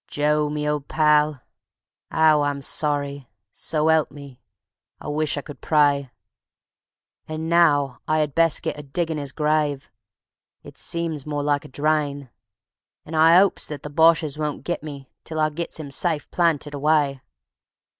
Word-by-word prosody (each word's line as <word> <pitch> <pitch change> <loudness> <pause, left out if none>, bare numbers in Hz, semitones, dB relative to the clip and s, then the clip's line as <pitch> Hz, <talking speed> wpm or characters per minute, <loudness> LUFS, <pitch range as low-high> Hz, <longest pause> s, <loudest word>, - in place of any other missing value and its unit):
Joe, 150 0 +1
me 150 0 -3
old 150 -1 -2
pal, 150 -3 +2 0.7
'ow 155 -2 +4
I'm 145 -1 -2
sorry; 140 -3 0 0.2
so 155 0 0
'elp 160 -2 +3
me, 140 -3 -13 0.6
I - - -7
wish 150 0 -1
I - - -2
could 145 0 -12
pray. 145 -3 +2 1.2
An' 155 +1 -5
now 145 -7 +3
I 155 0 +2
'ad 150 -2 -2
best 165 0 +2
get - - -3
a - - -5
diggin' 160 +2 -3
'is 140 -2 -5
grave 150 -2 -1 0.7
(it - - -13
seems 165 -4 -3
more 145 -1 -2
like 145 -1 0
a - - -8
drain) 145 -2 -1 0.7
And 160 - -7
I 165 +3 +7
'opes 195 0 +2
that 150 -3 -7
the 150 - -7
Boches 160 -1 +3
won't 150 -1 -3
git 175 - -3
me 140 -3 -9
till 160 -1 -5
I 155 0 +2
gits 165 +1 -5
'im 145 -3 -7
safe 155 +1 -1
planted 160 -4 0
away. 145 -2 +1
150 Hz, 155 wpm, -23 LUFS, 145-155 Hz, 1.2 s, I